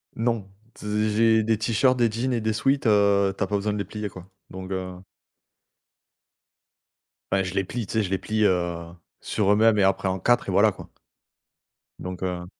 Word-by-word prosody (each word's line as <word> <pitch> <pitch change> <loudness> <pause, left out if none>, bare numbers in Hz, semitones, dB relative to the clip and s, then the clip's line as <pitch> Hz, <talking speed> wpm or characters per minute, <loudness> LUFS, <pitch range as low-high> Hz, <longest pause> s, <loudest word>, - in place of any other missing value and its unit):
Non 115 -3 -1 0.3
z 105 +1 -1
j'ai 110 +1 +3
des 110 0 +1
t-shirts, 115 +3 +2
des 120 -2 +3
jeans 125 +4 -2
et 115 - -1
des 110 0 0
sweats, 135 +5 0
heu, 100 -2 +3
tu - - 0
as - - -2
pas 105 - -2
besoin 105 +1 -1
de - - -3
les 100 - -2
plier 105 +2 -6
quoi. 90 -1 -12 0.2
Donc, 95 0 -8
heu 95 -1 -4 2.4
Bah 95 0 +2
je 95 -1 -5
les 95 - 0
plie, 115 +5 -5
tu - - -7
sais? 110 -1 +1
Je 95 - -4
les 95 - 0
plie, 110 +3 -1
heu, 85 -3 0 0.3
sur 100 -2 0
eux-mêmes 110 +1 +4
et - - +4
après 95 0 +1
en 95 0 -1
4 120 +7 +2
et - - -1
voilà, - - +4
quoi - - -12 1.1
donc, 90 -1 -7
heu 90 -1 -3
105 Hz, 200 wpm, -24 LUFS, 95-110 Hz, 2.4 s, eux-mêmes